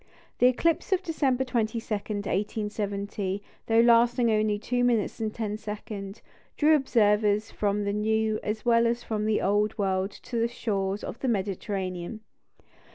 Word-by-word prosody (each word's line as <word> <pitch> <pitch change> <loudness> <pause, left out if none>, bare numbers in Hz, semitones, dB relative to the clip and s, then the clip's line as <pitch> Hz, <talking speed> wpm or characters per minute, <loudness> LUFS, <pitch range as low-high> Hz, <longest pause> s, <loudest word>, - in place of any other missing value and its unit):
The 250 - +6
eclipse 330 +9 +1
of 380 -1 +2
December 270 -6 +1
22, 235 -3 -1 0.2
1870, 205 -1 -3 0.2
though 225 0 +5
lasting 235 0 +4
only 215 -1 +2
two 245 +3 -1
minutes 235 -4 +1
and 220 -1 -1
ten 215 -2 -3
seconds, 210 -1 -7 0.3
drew 310 +1 +5
observers 210 -5 +2
from 205 0 0
the 200 0 -1
New, 220 +1 +1
as 215 +2 -4
well 235 -1 +4
as 235 +1 -1
from 215 -1 -2
the 215 - +1
Old 205 +2 +1
World 190 -1 0
to 235 +3 -5
the 230 - +2
shores 200 -4 -2
of - - -6
the 265 - -2
Mediterranean. 195 -2 -3
215 Hz, 150 wpm, -27 LUFS, 205-235 Hz, 0.3 s, The